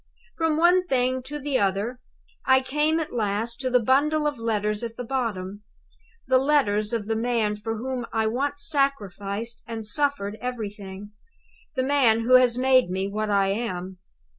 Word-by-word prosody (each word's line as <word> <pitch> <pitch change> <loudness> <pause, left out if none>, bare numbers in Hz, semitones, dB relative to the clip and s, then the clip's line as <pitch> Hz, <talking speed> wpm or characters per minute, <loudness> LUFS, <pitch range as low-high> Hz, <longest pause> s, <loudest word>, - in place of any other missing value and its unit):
"From 325 -2 0
one 355 +2 +4
thing 255 -1 +1
to 295 +2 -5
the 285 -2 -1
other, 205 +5 -1 0.4
I 260 0 +4
came 300 +4 0
at 320 - -5
last 225 +1 -2
to 260 -1 -1
the 250 0 +4
bundle 290 +6 +2
of 290 -4 -1
letters 210 -2 -1
at 230 -1 -6
the 245 - -4
bottom 210 -6 -3 0.6
the 260 0 +4
letters 235 -7 +1
of 230 -3 -2
the 225 +1 -1
man 225 -2 0
for 225 +2 -4
whom 250 +1 -4
I 220 -1 0
once 280 +5 0
sacrificed 230 - -1
and 225 -2 -6
suffered 215 -4 0
everything; 205 -5 -6 0.6
the 255 - 0
man 260 -5 +3
who 240 +3 +1
has 250 -1 +3
made 255 -3 +4
me 190 +1 -2
what 215 +1 -3
I 200 -1 +2
am. 190 -4 -4
235 Hz, 165 wpm, -25 LUFS, 210-265 Hz, 0.6 s, one